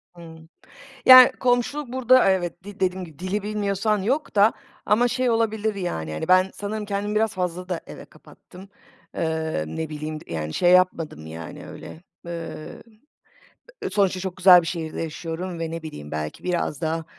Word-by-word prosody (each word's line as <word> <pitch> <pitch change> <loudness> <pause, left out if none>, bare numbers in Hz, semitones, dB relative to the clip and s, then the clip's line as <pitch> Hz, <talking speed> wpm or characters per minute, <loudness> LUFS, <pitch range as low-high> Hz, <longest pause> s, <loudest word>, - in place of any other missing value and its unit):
Hıı. 165 -2 -12 0.7
Yani, 255 -1 +10
komşuluk 250 +2 0
burada, 255 -3 +4
evet, 175 -2 -1
de 205 +1 -11
dediğim 185 0 -1
gibi 160 -3 -16
dili 190 +3 -3
bilmiyorsan 210 0 -1
yok 265 +9 -1
da. 205 +2 +5 0.3
Ama 235 +4 +3
şey 255 +1 0
olabilir, 220 -2 0
yani, 80 - -4
hani, 80 - -4
ben, 185 +1 +4
sanırım 210 +1 -5
kendimi 205 +1 -3
biraz 220 0 +1
fazla 180 0 -4
da 175 -3 -2
eve - - -10
kapattım. 190 +2 -16 0.5
Eee, 160 - -2
ne 160 - -5
bileyim, 155 0 -5
yani, 80 -2 -4
şey 175 - +3
yapmadım, 170 - +2
yani, 80 0 -9
öyle. 160 - -11 0.2
Eee, 170 -2 -7 1.1
sonuçta 195 -3 +1
çok 185 -1 -5
güzel 180 -1 +8
bir 165 - -7
şehirde 160 -2 -4
yaşıyorum 165 +2 -5
ve 165 -1 -3
ne 165 0 -5
bileyim, 75 - -9
belki 75 0 -5
biraz 175 -4 -2
daha 160 0 -2
180 Hz, 160 wpm, -23 LUFS, 160-210 Hz, 1.1 s, Yani